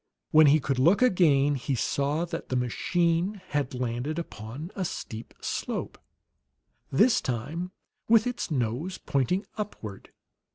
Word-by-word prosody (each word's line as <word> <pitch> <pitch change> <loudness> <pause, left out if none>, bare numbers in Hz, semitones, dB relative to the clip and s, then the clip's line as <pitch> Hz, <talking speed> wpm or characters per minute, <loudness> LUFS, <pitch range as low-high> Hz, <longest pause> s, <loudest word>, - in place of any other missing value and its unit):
When 155 -1 +7
he 150 +2 +6
could 135 -2 -1
look 175 - +5
again, 150 - +4
he 135 0 -1
saw 140 +7 0
that 170 - -6
the 130 - -1
machine 170 - +1
had 145 -3 -1
landed 125 +5 -2
upon 145 - -6
a 195 - -1
steep 115 -9 -6
slope, - - -3 0.9
this 225 - +4
time 145 +9 -3 0.4
with 225 -1 +5
its 245 -5 -2
nose 140 +6 -1
pointing 140 - 0
upward. 110 - -6
150 Hz, 130 wpm, -27 LUFS, 125-180 Hz, 0.9 s, When